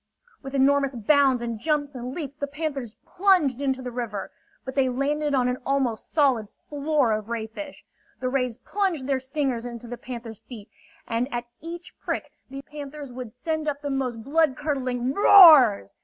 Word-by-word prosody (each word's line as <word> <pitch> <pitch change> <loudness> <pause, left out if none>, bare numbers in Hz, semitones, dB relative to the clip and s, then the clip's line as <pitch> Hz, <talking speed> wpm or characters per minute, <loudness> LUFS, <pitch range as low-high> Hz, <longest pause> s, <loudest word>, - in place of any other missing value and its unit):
With 270 0 -7
enormous 275 0 +3
bounds 260 +1 +3
and 230 -2 -4
jumps 295 +1 -1
and 250 -1 -6
leaps, 290 -5 -5
the 285 -1 -4
panthers 280 -6 -4
plunged 355 -9 +2
into 265 -2 -1
the 250 - -5
river. 225 -5 -5 0.3
But 260 - -5
they 260 -1 +2
landed 285 +3 0
on 250 -2 +2
an 250 0 -1
almost 265 -5 -1
solid 265 -8 +2 0.2
floor 290 -4 +1
of 215 0 -2
ray 230 -2 -2
fish. 285 +7 -9 0.3
The 255 - -2
rays 250 -3 -1
plunged 360 -1 -2
their 270 -1 0
stingers 260 -3 -2
into 240 -1 -8
the 245 +1 -6
panthers' 235 -4 -8
feet, 220 -2 -12 0.4
and 235 +3 -1
at 240 0 -3 0.2
each 340 +2 -8
prick - - -4 0.2
the 275 +1 -8
panthers 290 -2 -9
would 250 -2 -7
send 310 +7 -4
up 290 0 -3
the 285 - -2
most 250 -4 -2
bloodcurdling 270 -4 0
roars. 290 - +8
265 Hz, 170 wpm, -25 LUFS, 245-290 Hz, 0.4 s, roars